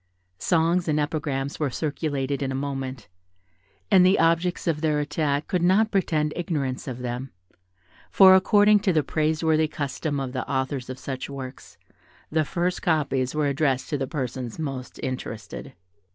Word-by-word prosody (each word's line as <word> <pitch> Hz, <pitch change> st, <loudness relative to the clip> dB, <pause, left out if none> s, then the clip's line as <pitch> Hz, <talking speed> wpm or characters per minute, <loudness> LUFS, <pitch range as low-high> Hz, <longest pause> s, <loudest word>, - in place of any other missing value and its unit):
Songs 170 Hz, +1 st, +2 dB
and 155 Hz, -1 st, +1 dB
epigrams 145 Hz, -2 st, -2 dB
were 150 Hz, -3 st, +1 dB
circulated 140 Hz, -1 st, -2 dB
in 135 Hz, -1 st, -1 dB
a -, -, -2 dB
moment; 135 Hz, -3 st, -4 dB, 0.8 s
and 190 Hz, -2 st, +7 dB
the 185 Hz, +2 st, +5 dB
objects 165 Hz, +2 st, +1 dB
of 160 Hz, -3 st, 0 dB
their 155 Hz, -2 st, +1 dB
attack 145 Hz, 0 st, -1 dB
could 180 Hz, -, 0 dB
not 200 Hz, +5 st, +3 dB
pretend 155 Hz, -6 st, +1 dB
ignorance 150 Hz, -7 st, -2 dB
of 125 Hz, -1 st, -5 dB
them, 125 Hz, +2 st, -4 dB, 0.8 s
for, 190 Hz, -1 st, +8 dB
according 205 Hz, +2 st, +5 dB
to 200 Hz, -2 st, +1 dB
the 155 Hz, -3 st, +2 dB
praiseworthy 155 Hz, +1 st, +1 dB
custom 145 Hz, 0 st, -3 dB
of 130 Hz, -2 st, -4 dB
the 130 Hz, -, -4 dB
authors 130 Hz, -1 st, -2 dB
of 130 Hz, -, -5 dB
such 135 Hz, 0 st, -5 dB
works, 135 Hz, -2 st, -9 dB, 0.5 s
the 155 Hz, 0 st, +2 dB
first 180 Hz, +3 st, -1 dB
copies 140 Hz, -5 st, 0 dB
were 150 Hz, -1 st, +1 dB
addressed 140 Hz, -1 st, 0 dB
to 145 Hz, -, +1 dB
the 135 Hz, -, -2 dB
persons 130 Hz, -5 st, -4 dB
most 135 Hz, -5 st, -5 dB
interested. 115 Hz, -5 st, -5 dB
150 Hz, 155 wpm, -25 LUFS, 135-165 Hz, 0.8 s, for